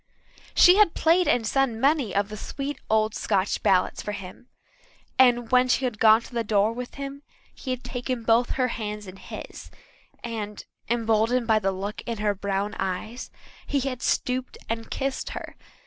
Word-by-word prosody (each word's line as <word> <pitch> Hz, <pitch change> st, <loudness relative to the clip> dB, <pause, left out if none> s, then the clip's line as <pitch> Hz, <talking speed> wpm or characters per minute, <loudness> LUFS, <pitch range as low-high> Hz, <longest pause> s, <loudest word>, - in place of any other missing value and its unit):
She 360 Hz, +2 st, +7 dB
had 420 Hz, -6 st, +5 dB
played 335 Hz, +1 st, +3 dB
and 245 Hz, -6 st, +2 dB
sung 250 Hz, -1 st, +1 dB
many 275 Hz, -5 st, +2 dB
of 200 Hz, +1 st, +1 dB
the 215 Hz, -, -6 dB
sweet 275 Hz, +6 st, -5 dB
old 215 Hz, 0 st, +2 dB
Scotch 195 Hz, -1 st, 0 dB
ballads 185 Hz, -1 st, +2 dB
for 210 Hz, -, -4 dB
him, 195 Hz, +4 st, -9 dB, 0.7 s
and 245 Hz, -2 st, +4 dB
when 255 Hz, 0 st, +5 dB
she 255 Hz, +1 st, +2 dB
had 230 Hz, -4 st, -3 dB
gone 220 Hz, 0 st, +6 dB
to 240 Hz, -, -14 dB
the 235 Hz, -1 st, 0 dB
door 210 Hz, 0 st, +2 dB
with 245 Hz, +1 st, -7 dB
him 280 Hz, 0 st, -6 dB, 0.3 s
he 265 Hz, -, -9 dB
had 255 Hz, -1 st, -2 dB
taken 245 Hz, -1 st, -4 dB
both 230 Hz, +2 st, +3 dB
her 255 Hz, -1 st, +1 dB
hands 210 Hz, -2 st, -5 dB
in 185 Hz, 0 st, -10 dB
his -, -, -9 dB, 0.5 s
and, 215 Hz, -3 st, -5 dB, 0.2 s
emboldened 230 Hz, +1 st, +2 dB
by 220 Hz, -1 st, +3 dB
the 195 Hz, -2 st, 0 dB
look 195 Hz, +2 st, -5 dB
in 230 Hz, -1 st, -2 dB
her 210 Hz, 0 st, +1 dB
brown 200 Hz, +1 st, -2 dB
eyes, 195 Hz, +6 st, -4 dB, 0.4 s
he 280 Hz, -, 0 dB
had 255 Hz, -2 st, -3 dB
stooped 255 Hz, 0 st, -1 dB
and 225 Hz, 0 st, -4 dB
kissed 270 Hz, -1 st, -3 dB
her. -, -, -8 dB
230 Hz, 180 wpm, -25 LUFS, 210-255 Hz, 0.7 s, She